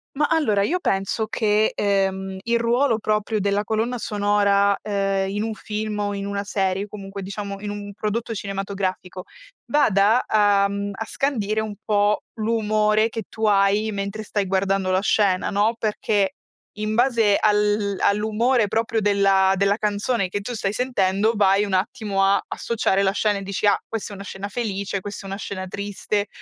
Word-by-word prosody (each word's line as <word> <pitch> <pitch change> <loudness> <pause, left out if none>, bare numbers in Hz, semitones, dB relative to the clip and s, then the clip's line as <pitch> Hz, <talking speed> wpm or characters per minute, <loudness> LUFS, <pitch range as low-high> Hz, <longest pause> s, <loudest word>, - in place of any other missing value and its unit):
Ma 295 +1 +2
allora, 255 -11 +2
io 330 - +1
penso 195 - -1
che, 215 -1 +1
ehm, 190 -1 0
il 235 0 +1
ruolo 235 0 +2
proprio 215 0 0
della 200 +1 0
colonna 225 +3 -1
sonora, 205 -2 +2
ehm, 195 -2 -1
in 205 +1 -2
un 220 -1 -3
film 215 -1 -4
o 205 0 -1
in 200 0 -4
una 200 0 -2
serie, 195 -1 -1
comunque 200 -1 -8
diciamo 200 0 -5
in 205 0 -4
un 205 0 -7
prodotto 225 +2 -3
cinematografico, 195 -2 -4 0.5
vada 220 -4 +4
a, 205 -2 +4
mhmm, 200 0 -3 0.2
scandire 220 -6 -1
un 215 -1 -4
po' 205 0 +2
l'umore 215 0 +1
che 225 -1 -5
tu 220 -1 -2
hai 205 +1 +3
mentre 200 +1 -4
stai 205 -1 -2
guardando 190 0 0
la 185 +1 +2
scena, 200 -3 +2
no? 210 +3 +1
Perché 205 -2 0 0.4
in 215 0 -2
base 235 -4 +3
al 210 -1 +2
all'umore 220 +3 +2
proprio 225 +2 0
della 195 -2 +3
della 200 +2 +2
canzone 210 0 0
che 205 +3 -4
tu 245 +5 -5
stai 200 -1 -2
sentendo, 215 -3 +1
vai 200 0 +3
un 200 - -4
attimo 195 0 0
a 195 +1 +3
associare 200 -4 0
la 190 - +3
scena, 205 0 +1
e 195 - -6
dici: 200 +2 -1
"Ah, 200 - +4
questa 225 -2 -5
è - - -7
una 200 - -8
scena 195 +1 -6
felice, 200 -3 -3
questa 205 +1 -8
è - - -7
una 195 - -4
scena 190 -2 -5
triste". 205 +1 -3
205 Hz, 170 wpm, -23 LUFS, 195-215 Hz, 0.5 s, vada